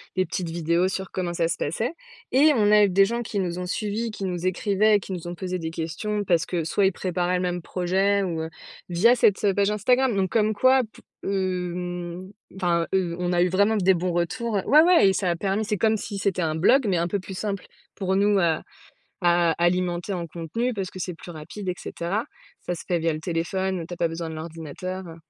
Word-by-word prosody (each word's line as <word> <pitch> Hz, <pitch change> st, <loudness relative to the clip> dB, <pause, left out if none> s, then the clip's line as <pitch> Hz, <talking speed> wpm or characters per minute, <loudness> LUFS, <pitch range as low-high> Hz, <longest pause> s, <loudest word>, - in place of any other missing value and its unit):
les 185 Hz, -, +2 dB
petites 175 Hz, -3 st, -3 dB
vidéos 170 Hz, +2 st, +1 dB
sur 190 Hz, 0 st, -4 dB
comment 175 Hz, -2 st, -2 dB
ça 165 Hz, -1 st, +1 dB
se 165 Hz, -, -2 dB
passait 220 Hz, -, -2 dB, 0.4 s
et 295 Hz, +4 st, +6 dB
on 210 Hz, -2 st, +3 dB
a 210 Hz, 0 st, +7 dB
eu -, -, 0 dB
des 195 Hz, +2 st, +5 dB
gens 235 Hz, +3 st, -2 dB
qui 215 Hz, -3 st, -3 dB
nous 180 Hz, -1 st, -2 dB
ont 180 Hz, -, -3 dB
suivis, 215 Hz, +4 st, -2 dB
qui 200 Hz, -2 st, -5 dB
nous 180 Hz, -1 st, -2 dB
écrivaient 205 Hz, +3 st, +2 dB
et -, -, +3 dB
qui 190 Hz, -, -7 dB
nous 175 Hz, -1 st, -6 dB
ont 175 Hz, -, -5 dB
posé 185 Hz, 0 st, -4 dB
des 160 Hz, 0 st, -3 dB
questions, 175 Hz, +6 st, -3 dB
parce 175 Hz, -2 st, +2 dB
que 170 Hz, -3 st, -1 dB
soit 195 Hz, +5 st, +1 dB
ils -, -, +2 dB
préparaient 180 Hz, 0 st, -1 dB
le 180 Hz, -, 0 dB
même 175 Hz, 0 st, -2 dB
projet 190 Hz, +3 st, +1 dB
ou 165 Hz, -3 st, -2 dB
heu 160 Hz, -, -5 dB, 0.4 s
via 215 Hz, +8 st, +5 dB
cette, 210 Hz, -3 st, +3 dB
heu, 195 Hz, -, +3 dB
page 200 Hz, +1 st, +2 dB
Instagram. 245 Hz, +3 st, +2 dB
Donc 190 Hz, -1 st, +1 dB
comme 215 Hz, -1 st, +2 dB
quoi, 260 Hz, +4 st, +5 dB
pou -, -, -17 dB, 0.2 s
hem 180 Hz, -1 st, -3 dB, 0.2 s
enfin 170 Hz, -3 st, +1 dB
heu 180 Hz, -3 st, +1 dB
on 180 Hz, 0 st, 0 dB
a 175 Hz, -, +3 dB
eu 180 Hz, -, +3 dB
vraiment 200 Hz, +4 st, +3 dB
des 190 Hz, -1 st, +4 dB
bons 180 Hz, +1 st, -1 dB
retours. 205 Hz, +6 st, -1 dB
Heu, 190 Hz, -, -1 dB
ouais 300 Hz, +2 st, +7 dB
ouais 340 Hz, -, +6 dB
et -, -, +2 dB
ça 185 Hz, -2 st, 0 dB
a -, -, 0 dB
permis 200 Hz, +4 st, -1 dB
c'est 210 Hz, -1 st, -1 dB
comme 220 Hz, +1 st, +2 dB
si 205 Hz, 0 st, -6 dB
c'était 190 Hz, -2 st, 0 dB
un 155 Hz, -1 st, 0 dB
blog, 245 Hz, +10 st, +4 dB
mais 185 Hz, -, +2 dB
un 170 Hz, +1 st, 0 dB
peu 200 Hz, +3 st, -1 dB
plus 190 Hz, +1 st, -8 dB
simple 200 Hz, -3 st, -3 dB, 0.3 s
pour 190 Hz, -2 st, -1 dB
nous 205 Hz, 0 st, +3 dB
à 165 Hz, -3 st, +2 dB, 0.6 s
à 175 Hz, -1 st, +3 dB
alimenter 175 Hz, +1 st, 0 dB
en 170 Hz, -2 st, -4 dB
contenu. 175 Hz, +10 st, -3 dB
Parce 195 Hz, -3 st, -3 dB
que -, -, -10 dB
c'est 180 Hz, 0 st, -3 dB
plus 175 Hz, -, -10 dB
rapide 165 Hz, +6 st, -8 dB
et -, -, 0 dB
cetera. 195 Hz, +7 st, -3 dB, 0.4 s
Ça 175 Hz, -, -3 dB
se 170 Hz, -, -9 dB
fait 175 Hz, -2 st, +1 dB
via 165 Hz, 0 st, +1 dB
le 155 Hz, -, -4 dB
téléphone, 175 Hz, +3 st, -2 dB
où -, -, -6 dB
tu 175 Hz, -, -8 dB
as -, -, -7 dB
pas 170 Hz, -, +2 dB
besoin 165 Hz, 0 st, -5 dB
de 160 Hz, -, -6 dB
l'ordinateur, 165 Hz, +3 st, -6 dB
heu 165 Hz, -, -9 dB
185 Hz, 245 wpm, -25 LUFS, 175-205 Hz, 0.6 s, a